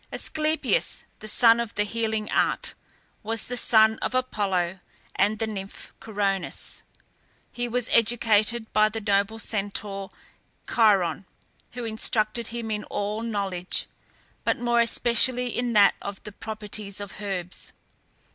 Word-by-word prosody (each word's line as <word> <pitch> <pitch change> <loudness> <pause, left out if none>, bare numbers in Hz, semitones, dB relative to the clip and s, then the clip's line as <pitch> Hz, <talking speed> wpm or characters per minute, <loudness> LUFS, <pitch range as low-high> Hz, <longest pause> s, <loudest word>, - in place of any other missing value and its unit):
Asclepias, 310 +10 0 0.2
the 215 -1 -4
god 230 -1 +7
of 235 -2 -3
the 210 - +2
healing 220 0 -2
art, - - +1 0.5
was 225 +1 0
the 245 - -5
son 220 -2 +5
of - - -2
Apollo 190 -8 0 0.4
and 210 +2 +2
the 225 - -1
nymph 195 -3 -7
Coronis. 200 -3 -2 0.7
He 240 0 -3
was 240 0 -1
educated 230 -1 +2
by 215 0 +5
the 225 +1 -4
noble 205 +1 +1
Centaur 200 -2 -3 0.6
Chiron, 195 -6 +3 0.5
who 245 -1 -5
instructed 220 +1 0
him 230 -1 -5
in 210 0 -2
all 210 +2 -3
knowledge, 195 -5 -3 0.6
but - - +1
more 240 0 +1
especially 240 +1 +3
in 245 -1 -1
that 205 -2 +6
of 200 -1 -6
the 210 - -8
properties 210 -1 -5
of 205 0 -8
herbs. 185 -3 -3
215 Hz, 130 wpm, -26 LUFS, 200-230 Hz, 0.7 s, god